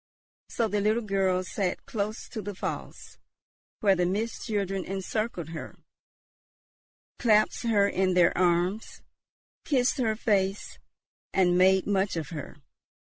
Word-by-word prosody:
So 230 Hz, -, 0 dB
the 205 Hz, 0 st, -1 dB
little 215 Hz, +3 st, +1 dB
girl 190 Hz, -3 st, +1 dB
sat 185 Hz, -1 st, -3 dB
close 215 Hz, 0 st, -4 dB
to 220 Hz, -, -5 dB
the 205 Hz, 0 st, -6 dB
falls, -, -, -6 dB, 0.6 s
where 195 Hz, -2 st, +4 dB
the 180 Hz, -1 st, +1 dB
Mist 215 Hz, +7 st, -3 dB
children 195 Hz, -3 st, -1 dB
encircled 195 Hz, -2 st, -3 dB
her, 165 Hz, -1 st, -7 dB, 1.4 s
clasped 215 Hz, +1 st, +2 dB
her 200 Hz, -3 st, +4 dB
in 185 Hz, -2 st, +1 dB
their 175 Hz, -1 st, +4 dB
arms, 180 Hz, +4 st, 0 dB, 0.6 s
kissed 260 Hz, -3 st, +1 dB
her 220 Hz, -3 st, +1 dB
face, 200 Hz, -3 st, -1 dB, 0.6 s
and 180 Hz, -2 st, +4 dB
made 190 Hz, +1 st, +4 dB
much 200 Hz, -1 st, 0 dB
of 160 Hz, -3 st, -4 dB
her. 150 Hz, -3 st, -7 dB
195 Hz, 130 wpm, -27 LUFS, 185-215 Hz, 1.4 s, where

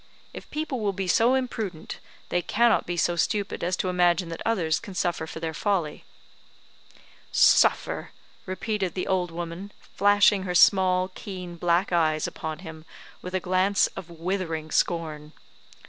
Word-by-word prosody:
If -, -, -10 dB
people 300 Hz, -4 st, -3 dB
will 205 Hz, -2 st, -1 dB
be 190 Hz, 0 st, -3 dB
so 235 Hz, +8 st, +4 dB
imprudent, 220 Hz, -10 st, -4 dB, 0.3 s
they 175 Hz, -, +1 dB
cannot 235 Hz, +5 st, +2 dB
be 175 Hz, 0 st, -3 dB
so 175 Hz, +1 st, +1 dB
stupid 200 Hz, +3 st, -1 dB
as 180 Hz, +1 st, 0 dB
to -, -, -2 dB
imagine 180 Hz, -1 st, +2 dB
that 165 Hz, -, -7 dB
others 175 Hz, -8 st, +1 dB
can 200 Hz, -5 st, -10 dB
suffer 175 Hz, -3 st, -1 dB
for 160 Hz, -, -7 dB
their 160 Hz, -1 st, -4 dB
folly." 175 Hz, -4 st, -2 dB, 1.3 s
"Suffer!" -, -, +3 dB, 0.4 s
repeated 190 Hz, -1 st, -2 dB
the 185 Hz, -, -2 dB
old 185 Hz, -2 st, 0 dB
woman, 170 Hz, +4 st, -6 dB, 0.2 s
flashing 205 Hz, 0 st, +4 dB
her 180 Hz, -1 st, -3 dB
small, 185 Hz, 0 st, +4 dB
keen 180 Hz, -3 st, -7 dB
black 175 Hz, +2 st, +1 dB
eyes 155 Hz, -3 st, +2 dB
upon 155 Hz, -1 st, -5 dB
him 160 Hz, -1 st, -9 dB, 0.4 s
with 180 Hz, +1 st, -6 dB
a -, -, +2 dB
glance 185 Hz, +2 st, +2 dB
of 185 Hz, -3 st, -8 dB
withering 165 Hz, -2 st, -3 dB
scorn. 155 Hz, -3 st, -1 dB
180 Hz, 150 wpm, -26 LUFS, 165-195 Hz, 1.3 s, so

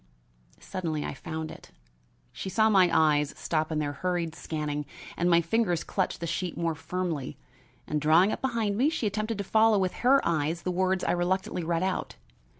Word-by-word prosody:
Suddenly 160 Hz, -5 st, -3 dB
I -, -, -4 dB
found 160 Hz, +3 st, -5 dB
it. -, -, -13 dB, 0.6 s
She 190 Hz, -, -5 dB
saw 220 Hz, +3 st, +3 dB
my 185 Hz, -3 st, +5 dB
eyes 150 Hz, -3 st, +3 dB
stop 155 Hz, -1 st, -1 dB
in 155 Hz, -, -1 dB
their 145 Hz, -1 st, -1 dB
hurried 175 Hz, 0 st, -2 dB
scanning 150 Hz, -3 st, -4 dB, 0.3 s
and 175 Hz, +1 st, +1 dB
my 170 Hz, -1 st, +5 dB
fingers 175 Hz, -1 st, 0 dB
clutch 190 Hz, -2 st, -1 dB
the 170 Hz, -, -5 dB
sheet 170 Hz, +2 st, -3 dB
more 170 Hz, -1 st, 0 dB
firmly, 160 Hz, -4 st, -4 dB, 0.5 s
and, 150 Hz, -1 st, -2 dB
drawing 165 Hz, +7 st, +5 dB
up -, -, -4 dB
behind 230 Hz, -6 st, 0 dB
me, 275 Hz, +4 st, +4 dB
she 310 Hz, -7 st, -2 dB
attempted 215 Hz, +1 st, -1 dB
to 200 Hz, -, -2 dB
follow 220 Hz, +2 st, +4 dB
with 185 Hz, -2 st, 0 dB
her 270 Hz, +3 st, +6 dB
eyes 165 Hz, 0 st, 0 dB
the 180 Hz, -, -1 dB
words 185 Hz, +1 st, +1 dB
I -, -, +1 dB
reluctantly 180 Hz, 0 st, -1 dB
read 170 Hz, +1 st, 0 dB
out. 190 Hz, -1 st, -2 dB
175 Hz, 185 wpm, -28 LUFS, 160-195 Hz, 0.6 s, her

